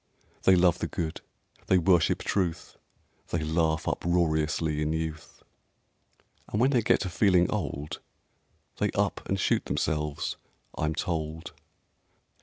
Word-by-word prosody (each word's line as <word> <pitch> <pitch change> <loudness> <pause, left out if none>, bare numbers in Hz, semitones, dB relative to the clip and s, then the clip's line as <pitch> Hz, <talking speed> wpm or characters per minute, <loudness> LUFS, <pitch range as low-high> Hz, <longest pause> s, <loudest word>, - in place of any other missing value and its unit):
They 95 - +7
love 90 -1 +3
the - - -2
Good; 80 -3 -4 0.5
they 95 - +5
worship 85 -1 +3
Truth; 85 -4 -2 0.5
They 85 -2 -2
laugh 80 0 0
uproariously 80 -2 0
in 75 +1 0
youth; 80 -1 -5 1.1
(And 105 - -1
when 130 +3 +4
they 125 -4 +3
get 110 - +3
to 95 - -2
feeling 90 -2 +4
old, 75 +1 -3 0.8
They - - +1
up - - 0
and - - 0
shoot - - +1
themselves, 75 -1 -2 0.4
I'm 75 0 -1
told)... 80 -1 -3
80 Hz, 125 wpm, -28 LUFS, 80-90 Hz, 1.1 s, They